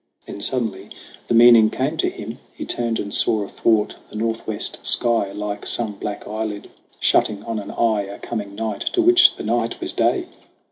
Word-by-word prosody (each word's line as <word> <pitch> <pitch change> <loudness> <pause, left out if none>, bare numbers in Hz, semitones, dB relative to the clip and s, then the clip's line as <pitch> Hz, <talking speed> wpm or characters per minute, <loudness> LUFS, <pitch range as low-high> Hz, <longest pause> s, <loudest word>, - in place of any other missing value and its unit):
Then 100 - -8
suddenly 105 -4 -1 0.4
the 120 - +1
meaning 115 -2 +8
came 140 +8 -2
to - - +1
him. 115 +3 -8 0.2
He - - -6
turned 115 -2 -2
and 100 0 -5
saw 110 -2 +1
athwart 105 +1 0
the - - -13
northwest 110 -1 -2
sky, 115 -4 +1
Like 105 0 -5
some 115 -3 +1
black 100 +1 -6
eyelid 105 -1 -5 0.3
shutting 105 -1 +2
on 115 -2 -3
an 100 - -8
eye, 110 -3 +1
A 100 - -8
coming 100 -3 -5
night 110 -1 -3
to 355 - +3
which 355 0 +6
the - - -7
night 115 +1 -1
was - - -4
day! - - +1
110 Hz, 180 wpm, -21 LUFS, 105-115 Hz, 0.4 s, meaning